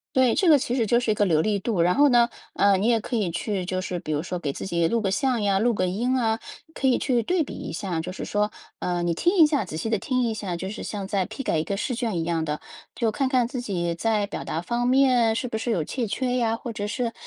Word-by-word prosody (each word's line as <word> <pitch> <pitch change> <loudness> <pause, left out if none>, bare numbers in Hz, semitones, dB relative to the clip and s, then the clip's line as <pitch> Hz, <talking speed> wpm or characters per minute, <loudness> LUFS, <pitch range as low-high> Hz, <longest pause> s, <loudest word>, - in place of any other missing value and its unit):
对， 260 -3 +4
这 370 - +3
个 305 - +8
其 250 -2 -1
实 230 -4 +1
就 235 +3 +3
是 240 - -1
一 - - +3
个 205 - +2
流 160 -5 +3
利 210 +1 +1
度。 195 -3 0
然 175 +1 +3
后 290 +1 +6
呢， 240 -2 +5 0.3
呃， 200 -1 +4
你 195 +3 0
也 230 -1 +3
可 235 - -3
以 195 -6 0
去 190 +2 -2
就 185 0 -1
是 180 -1 -3
比 155 -3 -5
如 150 - 0
说 180 0 -4
给 145 -5 -3
自 - - -6
己 170 -3 +1
录 230 +7 +1
个 195 - 0
像 240 +3 +1
呀、 200 -1 +2
录 230 +2 +2
个 185 -2 0
音 240 +8 0
啊。 225 -3 +1 0.3
可 275 - -2
以 255 - +3
去 245 -4 +1
对 360 +3 +1
比 - - -9
一 - - -6
下 175 -1 -3
就 180 +3 -5
是 - - -6
说， 210 +1 0 0.3
呃， 175 -1 -1
你 175 0 +1
听 350 - +1
一 325 - +9
下 290 -7 0
仔 165 -4 -7
细 220 +7 -3
地 220 - +2
听 255 +4 0
一 235 -2 0
下， 195 -5 -4
就 190 +2 -5
是 215 - -6
像 205 -2 -4
在 195 -3 0
批 220 +5 -6
改 165 - 0
一 155 - 0
个 200 - -2
试 240 +4 -2
卷 230 -6 -2
一 165 - 0
样 165 -1 -1
的， 150 -1 -3 0.3
就 230 -2 0
看 260 +5 0
看 250 -3 +2
自 250 0 -4
己 175 -7 -2
在 215 +2 +1
表 - - -5
达 160 - -2
方 240 +7 -1
面 250 -3 +4
是 250 +2 -2
不 220 - -3
是 230 +1 -1
有 175 - +1
欠 235 - -3
缺 250 +4 -1
呀。 230 -2 +1
或 235 0 -6
者 205 -2 -4
是 230 +2 -2
215 Hz, 315 characters per minute, -25 LUFS, 185-245 Hz, 0.3 s, 一